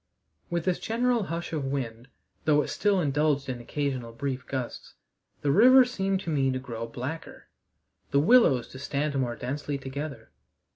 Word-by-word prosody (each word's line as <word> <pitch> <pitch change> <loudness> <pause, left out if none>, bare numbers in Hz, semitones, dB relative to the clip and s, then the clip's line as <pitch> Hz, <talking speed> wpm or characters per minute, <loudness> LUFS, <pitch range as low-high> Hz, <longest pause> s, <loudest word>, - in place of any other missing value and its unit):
With 170 -2 -2
this 185 -1 +1
general 235 -1 +1
hush 170 0 -4
of 155 - -1
the 135 - -3
wind 120 -3 -4 0.4
though 150 -1 +4
it - - -6
still 205 -2 +2
indulged 145 -2 +1
in 125 -2 -4
occasional 130 -2 -3
brief 130 +1 -4
gusts 130 -3 -5 0.5
the 145 - +3
river 255 - +8
seemed 195 -5 -1
to 170 - -4
me 135 -3 +2
to 130 - 0
grow 115 -3 -5
blacker, 130 +8 -6 0.6
the 140 - +3
willows 150 - +5
to 130 - -10
stand 145 +1 -1
more 125 -3 0
densely 140 +4 -3
together. 140 - -6
140 Hz, 165 wpm, -27 LUFS, 130-170 Hz, 0.6 s, river